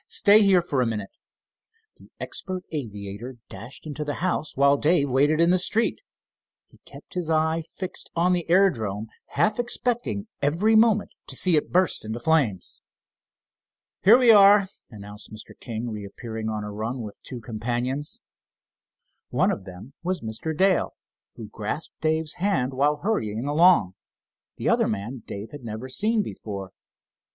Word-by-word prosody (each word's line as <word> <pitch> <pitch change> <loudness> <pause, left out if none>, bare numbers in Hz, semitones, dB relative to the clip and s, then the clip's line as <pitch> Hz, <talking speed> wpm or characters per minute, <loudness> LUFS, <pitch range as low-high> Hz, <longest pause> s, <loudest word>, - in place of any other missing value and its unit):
Stay 210 +1 +5
here 190 -4 +4
for 140 -6 0
a 125 - +1
minute." 105 -3 -4 0.9
The - - -18
expert 185 -1 -5
aviator 110 -3 -6
dashed 110 +11 -10
into 150 0 -5
the 145 -1 -3
house, 170 -5 -2
while 140 +1 +5
Dave 145 -1 +2
waited 145 +4 +3
in 170 +1 +4
the 185 - +3
street. 220 +5 +1 0.7
He - - -23
kept - - -13
his 175 -3 -3
eye 160 +1 +1
fixed 185 -1 -5
on 175 +2 +3
the 175 -2 -2
aerodrome, 115 - +2 0.3
half 215 +2 +2
expecting 240 -3 -1 0.2
every 175 +10 +2
moment 220 -2 +4 0.2
to - - -4
see 180 -3 +5
it 150 - 0
burst 185 +1 +2
into 110 +2 -5
flames. 130 - 0 1.2
"Here 220 +5 +8
we 250 -3 +6
are," 200 -2 +7 0.2
announced 105 -1 -11
Mr. 110 0 -11
King, 115 0 -5
reappearing 110 +2 -6
on 105 -1 -3
a 105 - -6
run 115 +5 -4
with 105 -2 -10
two 125 - -8
companions. 120 +5 -3 1.1
One - - +2
of 95 - -5
them 95 +8 -11
was 180 0 -2
Mr. 115 +8 -5
Dale, 190 0 +2 0.4
who 110 - -8
grasped 110 +9 -6
Dave's 160 0 -1
hand 175 -9 0
while 145 +3 +1
hurrying 115 - -1
along. 150 - +4 0.6
The - - -3
other - - +3
man 110 +5 -4
Dave 100 +2 -7
had 145 -3 -10
never 115 +3 -6
seen 215 - 0
before. 100 - -7
145 Hz, 155 wpm, -25 LUFS, 110-180 Hz, 1.2 s, Here